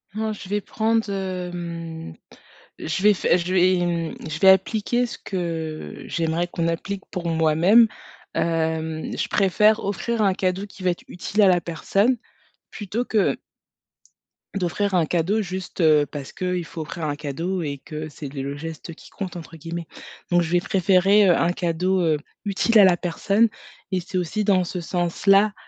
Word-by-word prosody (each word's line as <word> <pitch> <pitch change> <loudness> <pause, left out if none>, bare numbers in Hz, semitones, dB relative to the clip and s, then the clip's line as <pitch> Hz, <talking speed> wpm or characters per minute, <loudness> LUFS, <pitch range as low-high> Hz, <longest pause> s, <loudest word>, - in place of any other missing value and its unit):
Non, 220 0 -1
je 195 - -10
vais 205 0 0
prendre 225 0 0
hem, 175 - -5 0.7
je 170 +5 -3
vais 210 0 +7
fai 180 - +2
je 180 +1 -2
vais 180 -1 +3 0.3
mmh, - - -8
je 155 +1 -4
vais 190 - +7
appliquer 220 +5 +3
ce 240 - -7
que 165 -4 -5
j'aimerais 165 +1 -1
qu'on 170 -1 -2
applique 195 +4 -4
pour 175 -3 -4
moi-même. 165 +8 +5 0.5
Hem, 160 -1 -1
je - - -1
préfère 210 +2 +3
offrir 205 +4 -1
un 195 -2 +3
cadeau 185 +2 -1
qui 195 -2 -13
va 180 - +3
être 175 - -7
utile 195 +4 -1
à 200 - +7
la 180 -2 +5
personne 200 +8 +1 0.5
plutôt 215 +3 -3
que 215 -4 +1 1.2
d'offrir 195 +2 -1
un 170 -3 +3
cadeau 180 +7 +1
juste, 185 -1 -5
heu, 155 -2 +5
parce 140 -3 -7
qu'il 180 -1 -2
faut 165 - -7
offrir 160 +2 -6
un 145 -2 -1
cadeau 165 +6 -3
et 140 -2 -4
que 155 0 -6
«c'est 145 -1 -8
le 140 0 -4
geste 160 +2 -7
qui - - -15
compte» 190 -3 -6
entre 165 -1 -9
guillemets. 165 +1 -6 0.4
Donc 175 - +4
je 165 - -2
vais 175 0 +3
préférer, 195 +1 +4
heu, 175 - +6
un 170 +1 +2
cadeau, 180 +1 0
heu, 160 -3 +2 0.3
utile 215 +3 +3
à 200 - +9
la 180 -2 +5
personne 200 +6 +1 0.4
et 185 - +1
c'est 180 +1 -5
aussi 180 +4 -1
dans 185 -3 +3
ce 180 +1 -4
sens-là 195 +4 +2
180 Hz, 175 wpm, -23 LUFS, 165-200 Hz, 1.2 s, à